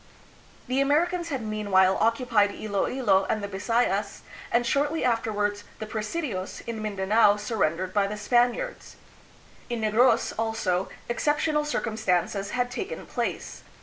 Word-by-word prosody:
The 260 +2 +1
Americans 335 +5 +1
had 265 -6 -3
mean 215 -1 -4
while 190 0 +5
occupied 230 -2 +2
Iloilo 205 -1 +1
and 215 -2 0
the - - -2
Bisayas, 200 0 -1 0.3
and 240 +1 +2
shortly 290 +5 +1
after 230 -2 +1
wards 205 0 -1
the 215 - -5
presidios 215 - -4
in 230 -2 -4
Mindanao 205 +1 +3
surrendered 185 -5 -1
by 200 -1 +2
the 210 +1 -5
Spaniards. 245 - 0 0.7
In 240 -2 -2
Negros, 220 +4 +3
also, 215 -5 0 0.2
exceptional 300 +4 +1
circumstances 205 - -1
had 245 +2 -1
taken 380 +10 -5
place. - - -4
220 Hz, 130 wpm, -26 LUFS, 205-250 Hz, 0.7 s, while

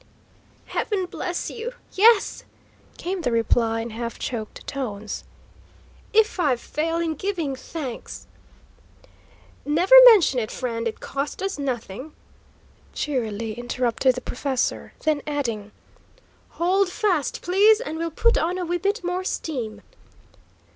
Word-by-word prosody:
"Heaven 395 -4 -1
bless 355 0 -4
you, 475 +2 -5 0.2
yes!" 440 +1 +4 0.5
came 365 +1 -3
the 250 - 0
reply, 230 0 +2
in 230 0 -5
half 230 +1 -5
choked 220 -4 -5
tones. 215 -7 -5 0.9
"If 440 -2 +3
I 285 -7 +3
fail 320 +7 -2
in 335 -1 0
giving 330 -5 -2
thanks 260 -2 -7 0.7
" - - -29
"Never 335 +9 +2
mention 390 - +7
it, 220 - -3
friend; 230 -2 -3
it 225 - -5
cost 280 +6 -4
us 390 -6 -2
nothing," 260 +1 -4 0.8
cheerily 225 -6 -2
interrupted 240 +2 0
the 255 - -5
professor, 260 +1 -2
then 310 -2 +1
adding, 230 -8 -2 0.9
"Hold 370 +3 +2
fast, 360 -6 0
please, 410 +5 +5
and 320 -10 -5
we'll 335 0 -1
put 465 +9 +2
on 350 +3 0
a 365 - -2
wee 350 +1 -1
bit 400 +4 -1
more 360 +1 -1
steam." 255 - -4
295 Hz, 125 wpm, -24 LUFS, 240-365 Hz, 0.9 s, mention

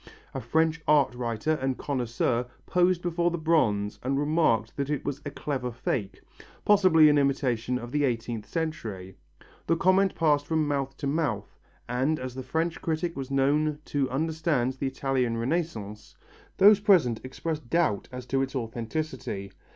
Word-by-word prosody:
A - - -4
French 160 +6 +1
art 145 -4 +4
writer 120 +3 -2
and 135 -1 -1
connoisseur 120 -2 -1 0.2
posed 180 -1 +2
before 175 0 +1
the 175 - -3
bronze 125 -11 +1
and 135 +2 -1
remarked 145 -7 +1
that 140 0 -2
it 150 -2 -2
was 140 0 -3
a - - -2
clever 135 -4 -3
fake, 110 -3 -3 0.5
possibly 185 -7 +6
an 150 -1 +5
imitation 125 -3 0
of 120 -1 -7
the 145 +1 +1
eighteenth 115 -4 -2
century. 115 - -4 0.5
The 165 - +3
comment 190 +2 +3
passed 145 -3 +2
from 160 -2 +1
mouth 140 -2 -2
to 145 - -5
mouth, 140 -9 -1 0.3
and 130 +6 0
as 130 -1 -5
the 130 - -5
French 160 +6 -2
critic 165 +1 -2
was 135 -1 -5
known 145 +3 +2 0.2
to 140 -2 +1
understand 155 -2 0
the 135 +1 -3
Italian 130 -3 -1
Renaissance, 115 - -3 0.4
those 205 +1 +7
present 175 - +3
expressed 150 +1 -5
doubts 165 - +1
as 125 0 -7
to 135 0 0
its 135 +1 -3
authenticity. 120 -3 -4
140 Hz, 160 wpm, -27 LUFS, 120-160 Hz, 0.5 s, those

